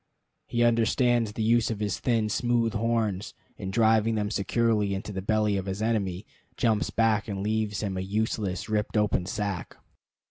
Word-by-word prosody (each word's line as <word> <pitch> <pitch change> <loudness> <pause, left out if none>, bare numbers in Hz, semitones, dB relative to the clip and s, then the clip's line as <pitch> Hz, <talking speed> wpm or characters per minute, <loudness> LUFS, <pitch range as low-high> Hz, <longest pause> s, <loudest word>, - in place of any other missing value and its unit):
He 120 0 +1
understands 120 -1 +2
the 110 - -2
use 115 +1 +3
of 110 -3 -3
his 105 -3 -2
thin, 115 -3 +1
smooth 120 0 +1
horns, 110 -3 -1 0.2
and, 95 - -5
driving 110 0 +3
them 105 -1 -1
securely 105 -1 +1
into 95 +2 -5
the 95 - -3
belly 105 0 +1
of 95 0 -4
his 95 +1 -3
enemy, 105 -4 -1 0.3
jumps 110 -3 +1
back 110 -2 +1
and 100 -2 -3
leaves 110 -1 -1
him 95 -2 -2
a - - -1
useless, 100 -1 -2
ripped 110 0 -1
open 105 -4 +1
sack. 100 -4 -4
110 Hz, 170 wpm, -27 LUFS, 100-115 Hz, 0.3 s, use